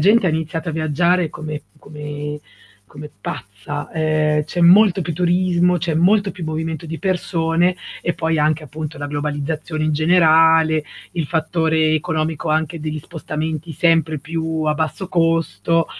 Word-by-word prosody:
gente 205 +5 +4
ha - - +3
iniziato 160 +2 -3
a - - -2
viaggiare 160 +2 +1
come 150 -1 -6 0.2
come 150 0 -6 0.4
come 150 +8 -10
pazza, 100 +9 -6
ehm, 155 -2 +1
c'è 175 +3 -4
molto 190 +2 +6
più 165 0 -3
turismo, 180 +1 +2
c'è 165 0 -1
molto 195 +5 +3
più 180 -4 -7
movimento 160 0 -3
di 165 0 -6
persone 175 -2 +1 0.3
e 175 - 0
poi 160 -1 -1
anche 155 +1 +1
appunto 155 0 -7
la 145 - -4
globalizzazione 150 +2 -3
in 155 - +1
generale, 160 -1 +4 0.3
il 170 -3 -2
fattore 160 0 +1
economico 155 -1 -1
anche 160 +1 0
degli 155 0 -3
spostamenti 160 0 -5
sempre 165 -2 +2
più 160 +1 -3
a 150 0 +1
basso 160 +4 -3
costo, 165 -1 +1
160 Hz, 145 wpm, -20 LUFS, 155-170 Hz, 0.4 s, molto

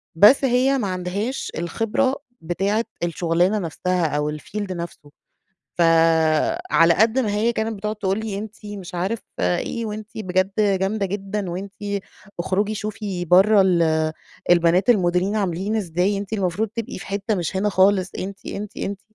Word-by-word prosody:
بس 210 +11 +7
هي 260 +2 +3
ما 215 -6 -1
عندهاش 185 +8 -3
الخبرة 225 +10 0 0.3
بتاعة 195 +7 0 0.2
الشغلانة 175 +4 +1
نفْسها 180 0 -1
أو 150 0 -1
الfield 205 +4 -5
نفْسه. 170 -4 -7 0.7
فعلى 165 - +3
قد 220 +6 +3
ما 220 -5 +1
هي 225 +3 +2
كانت 220 -1 -2
بتقعد 210 +2 -3
تقول 195 0 -1
لي 215 -3 -4
أنتِ 215 +1 -7
مش 195 -4 -8
عارف 190 +6 -1 0.2
إيه، 155 - -1
وأنتِ 215 0 -6
بجد 185 -2 0
جامدة 200 0 +1
جدًا، 195 0 -3
وأنتِ 190 +3 -6 0.7
أخرجي 205 +4 0
شوفي 210 -4 -4
برّه 195 +4 +6
ال 160 -4 +2 0.4
البنات 175 +5 +4
المُديرين 185 -1 +2
عاملين 195 +2 -1
إزاي، 190 0 0
أنتِ 200 +1 -7
المفروض 200 +2 -1
تبقي 230 -4 -4
في - - -10
حتّة 200 +2 -1
مش 175 +1 -2
هنا 205 +2 +1
خالص، 190 -1 +3
أنتِ، 195 +1 -6
أنتِ، 210 0 -6
أنتِ 200 0 -4
195 Hz, 145 wpm, -22 LUFS, 175-215 Hz, 0.7 s, بس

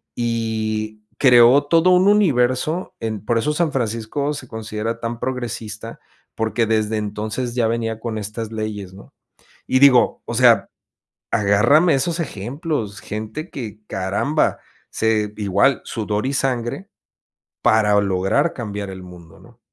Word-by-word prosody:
y 110 -2 -2 0.2
creó 125 +1 +6
todo 165 +4 +4
un 180 +1 +5
universo 155 -4 +2
en 110 -2 -3
por 115 +1 +1
eso 150 +6 +1
San 160 0 0
Francisco 120 +4 -2
se 130 -3 -8
considera 110 0 -4
tan 115 0 -4
progresista, 115 -3 -5 0.4
porque, 110 +1 0
desde 110 0 +1
entonces 110 +4 -3
ya 120 -2 +2
venía 115 -1 -2
con 115 -1 -4
estas 110 +1 -5
leyes, 105 -4 -5
¿no? 100 - -15 0.5
Y 130 - +2
digo, 130 -3 +5
o 120 - -4
sea, 115 -5 +5 0.6
agárrame 125 - +4
esos 165 +5 -1
ejemplos, 120 - -4
gente 110 - -6
que 110 -5 -7
caramba, 100 +11 0 0.3
se 110 -2 0
igual 100 +6 +2
sudor 105 0 -2
y 135 - -1
sangre, 130 - -2 0.7
para 105 -2 +4
lograr 100 - +1
cambiar 105 -4 -5
el 95 -1 -8
mundo, 90 -3 -14
¿no? - - -19
115 Hz, 135 wpm, -21 LUFS, 105-130 Hz, 0.7 s, creó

